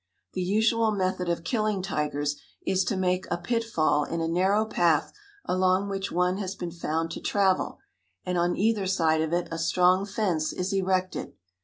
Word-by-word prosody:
The -, -, -2 dB
usual 220 Hz, +4 st, +2 dB
method 185 Hz, -3 st, -1 dB
of 170 Hz, -1 st, -1 dB
killing 215 Hz, 0 st, 0 dB
tigers 145 Hz, -4 st, -2 dB, 0.2 s
is 190 Hz, 0 st, +2 dB
to 190 Hz, -, -1 dB
make 185 Hz, 0 st, 0 dB
a 175 Hz, -, 0 dB
pitfall 175 Hz, -7 st, +1 dB
in 165 Hz, +3 st, -3 dB
a 165 Hz, -, 0 dB
narrow 190 Hz, +6 st, +2 dB
path 170 Hz, -7 st, +1 dB, 0.3 s
along 185 Hz, +2 st, +2 dB
which 195 Hz, 0 st, -3 dB
one 180 Hz, +2 st, +1 dB
has 195 Hz, -1 st, -4 dB
been 175 Hz, -3 st, -5 dB
found 165 Hz, -1 st, -2 dB
to -, -, -6 dB
travel, 195 Hz, -2 st, +1 dB, 0.5 s
and 180 Hz, -, -1 dB
on 175 Hz, 0 st, +1 dB
either 210 Hz, -2 st, +1 dB
side 160 Hz, -4 st, +2 dB
of 160 Hz, 0 st, -1 dB
it 175 Hz, 0 st, 0 dB
a 165 Hz, -, -3 dB
strong 180 Hz, +3 st, +3 dB
fence 190 Hz, -7 st, -1 dB
is 185 Hz, +2 st, -2 dB
erected. 185 Hz, -1 st, -1 dB
185 Hz, 175 wpm, -27 LUFS, 170-195 Hz, 0.5 s, strong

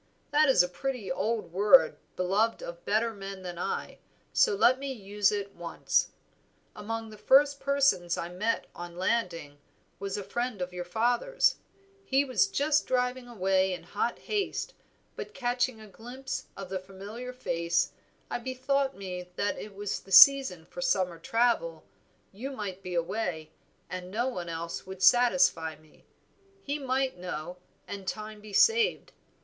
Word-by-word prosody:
That 300 Hz, 0 st, +4 dB
is 185 Hz, -9 st, +6 dB
a -, -, -1 dB
pretty 250 Hz, +3 st, -4 dB
old 220 Hz, -8 st, -2 dB
word 210 Hz, +8 st, +6 dB, 0.2 s
beloved 200 Hz, +5 st, +1 dB
of 170 Hz, 0 st, -8 dB
better 225 Hz, +2 st, +1 dB
men 195 Hz, -2 st, -8 dB
than 175 Hz, -1 st, -6 dB
I, -, -, -3 dB, 0.3 s
so 440 Hz, -4 st, +4 dB
let 255 Hz, -9 st, +4 dB
me 275 Hz, 0 st, -4 dB
use 205 Hz, -3 st, 0 dB
it 200 Hz, -1 st, -3 dB
once. 170 Hz, -1 st, 0 dB, 0.7 s
Among 225 Hz, +1 st, -5 dB
the 215 Hz, -, -12 dB
first 280 Hz, +1 st, +5 dB
persons 275 Hz, -12 st, +2 dB
I 170 Hz, -, -3 dB
met 210 Hz, +6 st, -1 dB
on 175 Hz, 0 st, -9 dB
landing 180 Hz, -8 st, -1 dB, 0.4 s
was 195 Hz, 0 st, -3 dB
a 205 Hz, -, -4 dB
friend 240 Hz, +2 st, -3 dB
of 180 Hz, 0 st, -4 dB
your 180 Hz, 0 st, -5 dB
father's; 240 Hz, -, +2 dB, 0.5 s
he 275 Hz, -4 st, +2 dB
was 265 Hz, +9 st, +2 dB
just 300 Hz, -4 st, +1 dB
driving 250 Hz, 0 st, 0 dB
away 190 Hz, -4 st, +1 dB
in 180 Hz, -, -6 dB
hot -, -, -2 dB
haste, 415 Hz, -2 st, -2 dB, 0.4 s
but 430 Hz, -, -8 dB
catching 245 Hz, -2 st, 0 dB
a 215 Hz, -, -11 dB
glimpse 245 Hz, +7 st, -7 dB
of 195 Hz, -2 st, -7 dB
the 190 Hz, 0 st, -2 dB
familiar 200 Hz, +6 st, -8 dB
face, 170 Hz, -9 st, 0 dB, 0.4 s
I -, -, -3 dB
bethought 265 Hz, +2 st, -1 dB
me 180 Hz, -2 st, -6 dB
that 200 Hz, -1 st, -1 dB
it 205 Hz, -2 st, -9 dB
was 205 Hz, 0 st, -3 dB
the 195 Hz, -, -17 dB
season 260 Hz, -7 st, +8 dB
for 265 Hz, -, -8 dB
summer 185 Hz, -9 st, +1 dB
travel, 245 Hz, -, +1 dB, 0.5 s
you 235 Hz, +8 st, -6 dB
might 205 Hz, -8 st, -6 dB
be 180 Hz, -2 st, -5 dB
away, 170 Hz, -3 st, -2 dB, 0.4 s
and 180 Hz, 0 st, -6 dB
no 230 Hz, +6 st, -1 dB
one 180 Hz, -8 st, -5 dB
else 165 Hz, +2 st, -5 dB
would 190 Hz, 0 st, -6 dB
satisfy 180 Hz, -9 st, +4 dB
me; 155 Hz, 0 st, -23 dB, 0.6 s
he 285 Hz, +1 st, -2 dB
might 265 Hz, -5 st, -1 dB
know, 180 Hz, -1 st, -5 dB, 0.3 s
and 195 Hz, -2 st, -7 dB
time 215 Hz, +1 st, -5 dB
be 210 Hz, 0 st, -11 dB
saved. 455 Hz, -, +3 dB
210 Hz, 155 wpm, -29 LUFS, 180-255 Hz, 0.7 s, season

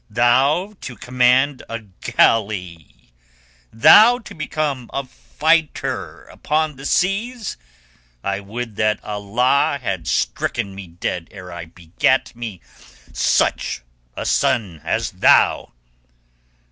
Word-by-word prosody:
Thou 135 Hz, -, +2 dB
to 125 Hz, -, -7 dB
command 125 Hz, +4 st, +2 dB
a 115 Hz, -, -3 dB
galley! 95 Hz, -, -1 dB, 0.6 s
Thou 220 Hz, -, +7 dB
to 235 Hz, -, -12 dB
become 150 Hz, -5 st, -3 dB
a 140 Hz, 0 st, -3 dB
fighter 160 Hz, +4 st, -1 dB
upon 155 Hz, 0 st, -2 dB
the 135 Hz, +2 st, -6 dB
seas! 215 Hz, +5 st, -1 dB, 0.7 s
I 100 Hz, 0 st, -1 dB
would 110 Hz, +2 st, -7 dB
that 110 Hz, -1 st, +1 dB
Allah 120 Hz, +8 st, +1 dB
had 95 Hz, -9 st, -4 dB
stricken 105 Hz, -5 st, -1 dB
me 95 Hz, -1 st, -9 dB
dead 85 Hz, 0 st, -4 dB
ere 90 Hz, -3 st, -11 dB
I 85 Hz, -1 st, -7 dB
begat 85 Hz, +11 st, -1 dB
me 115 Hz, -6 st, -7 dB, 0.5 s
such -, -, 0 dB, 0.3 s
a -, -, -4 dB
son 95 Hz, -10 st, 0 dB
as -, -, -1 dB
thou!" -, -, +3 dB
120 Hz, 110 wpm, -20 LUFS, 100-145 Hz, 0.7 s, Thou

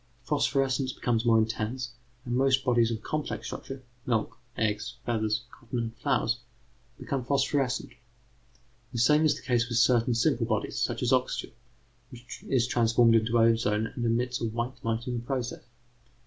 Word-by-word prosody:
Phosphorescence 135 Hz, -2 st, +1 dB
becomes 120 Hz, -1 st, 0 dB
more 115 Hz, -1 st, +5 dB
intense, 115 Hz, +3 st, -1 dB, 0.3 s
and 120 Hz, -1 st, -2 dB
most 135 Hz, 0 st, +3 dB
bodies 120 Hz, -2 st, +3 dB
of 110 Hz, -2 st, -4 dB
complex 155 Hz, -1 st, -3 dB
structure 135 Hz, -1 st, -7 dB, 0.2 s
milk, 115 Hz, -4 st, 0 dB, 0.2 s
eggs, 110 Hz, +2 st, -1 dB
feathers, 110 Hz, -1 st, 0 dB
cotton, 120 Hz, 0 st, -7 dB
and 115 Hz, -1 st, -3 dB
flowers 120 Hz, +2 st, 0 dB, 0.6 s
become 135 Hz, -2 st, -3 dB
phosphorescent. 135 Hz, 0 st, 0 dB, 1.0 s
The -, -, -3 dB
same 150 Hz, +7 st, +4 dB
is 155 Hz, -, +3 dB
the -, -, -11 dB
case 120 Hz, -2 st, +1 dB
with 120 Hz, -, 0 dB
certain 120 Hz, 0 st, +4 dB
simple 120 Hz, -2 st, +2 dB
bodies, 110 Hz, -2 st, -1 dB
such -, -, -1 dB
as -, -, +2 dB
oxygen, -, -, 0 dB, 0.6 s
which 120 Hz, -1 st, -11 dB
is 125 Hz, -3 st, +3 dB
transformed 115 Hz, -1 st, +4 dB
into 115 Hz, +1 st, +3 dB
ozone 115 Hz, -1 st, +2 dB
and 120 Hz, -, -3 dB
emits 120 Hz, +2 st, 0 dB
a -, -, 0 dB
white 120 Hz, +3 st, -4 dB
light 115 Hz, +1 st, -1 dB
in 125 Hz, -, -3 dB
the -, -, -9 dB
process. 125 Hz, -1 st, -3 dB
120 Hz, 160 wpm, -28 LUFS, 115-130 Hz, 1.0 s, more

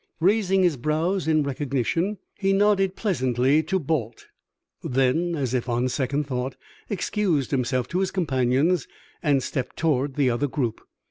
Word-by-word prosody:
Raising 195 Hz, +1 st, +3 dB
his 170 Hz, -6 st, +2 dB
brows 160 Hz, +8 st, 0 dB
in 155 Hz, -1 st, +3 dB
recognition, 140 Hz, -, -1 dB, 0.2 s
he 195 Hz, 0 st, 0 dB
nodded 195 Hz, -1 st, +3 dB
pleasantly 130 Hz, -, +2 dB
to 175 Hz, +5 st, -1 dB
Balt; 135 Hz, -, -2 dB, 0.6 s
then, 135 Hz, +7 st, +1 dB
as 130 Hz, -5 st, -2 dB
if 125 Hz, -1 st, -1 dB
on 120 Hz, +2 st, +1 dB
second 140 Hz, +3 st, -1 dB
thought, 130 Hz, -1 st, -3 dB, 0.3 s
excused 190 Hz, -, 0 dB
himself 125 Hz, -2 st, 0 dB
to 180 Hz, -, -1 dB
his 190 Hz, -1 st, +1 dB
companions 140 Hz, 0 st, +1 dB, 0.3 s
and 140 Hz, -3 st, +2 dB
stepped 130 Hz, -4 st, -4 dB
toward 145 Hz, -4 st, 0 dB
the 140 Hz, -3 st, +2 dB
other 120 Hz, +5 st, 0 dB
group. 125 Hz, -5 st, -2 dB
145 Hz, 145 wpm, -24 LUFS, 130-180 Hz, 0.6 s, Raising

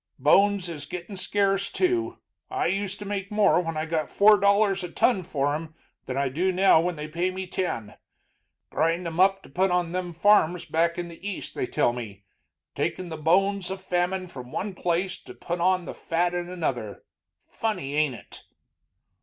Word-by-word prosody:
Bones 200 Hz, -2 st, +4 dB
is 150 Hz, -4 st, -7 dB
gittin' 180 Hz, +4 st, -7 dB
scarce, 195 Hz, +1 st, 0 dB
too. 355 Hz, -1 st, 0 dB, 0.3 s
I 385 Hz, 0 st, -1 dB
used 200 Hz, 0 st, -1 dB
to 205 Hz, -, -8 dB
make 200 Hz, -1 st, -3 dB
more 210 Hz, -3 st, +4 dB
when 165 Hz, -2 st, -4 dB
I 155 Hz, -, -1 dB
got 160 Hz, -2 st, -2 dB
four 210 Hz, 0 st, +6 dB
dollars 200 Hz, -1 st, +3 dB
a 180 Hz, -, -4 dB
ton 195 Hz, +3 st, +2 dB
for 145 Hz, -5 st, -1 dB
'em 160 Hz, +1 st, -5 dB, 0.3 s
than 130 Hz, -, -3 dB
I 140 Hz, 0 st, +1 dB
do 170 Hz, +9 st, 0 dB
now 185 Hz, -3 st, +5 dB
when 175 Hz, +1 st, -1 dB
they 150 Hz, 0 st, -6 dB
pay 170 Hz, +4 st, -1 dB
me 190 Hz, 0 st, -5 dB
ten. 115 Hz, -, -3 dB, 0.8 s
Grind 165 Hz, +3 st, +1 dB
'em 165 Hz, 0 st, -4 dB
up 195 Hz, +1 st, +4 dB
to -, -, -14 dB
put 185 Hz, +7 st, +1 dB
on 180 Hz, -1 st, 0 dB
them 180 Hz, -1 st, -3 dB
farms 175 Hz, -1 st, +3 dB
back 170 Hz, +1 st, +1 dB
in 175 Hz, -1 st, -3 dB
the 170 Hz, +1 st, -13 dB
East, 195 Hz, -, -6 dB
they -, -, -2 dB
tell 120 Hz, -, +1 dB
me. 105 Hz, -5 st, -8 dB, 0.5 s
Takin' 185 Hz, -2 st, -2 dB
the 160 Hz, -, -5 dB
bones 185 Hz, +4 st, +2 dB
of 190 Hz, 0 st, -4 dB
famine 185 Hz, 0 st, -1 dB
from 125 Hz, -6 st, -10 dB
one 200 Hz, 0 st, -3 dB
place 180 Hz, +1 st, -1 dB
to -, -, -13 dB
put 175 Hz, 0 st, -4 dB
on 185 Hz, 0 st, +2 dB
fat 175 Hz, +1 st, -1 dB
in 175 Hz, 0 st, -3 dB
another. 135 Hz, -, -3 dB, 0.4 s
Funny, 185 Hz, -11 st, -3 dB
ain't 150 Hz, -4 st, +2 dB
it?" -, -, -13 dB
180 Hz, 185 wpm, -26 LUFS, 160-195 Hz, 0.8 s, four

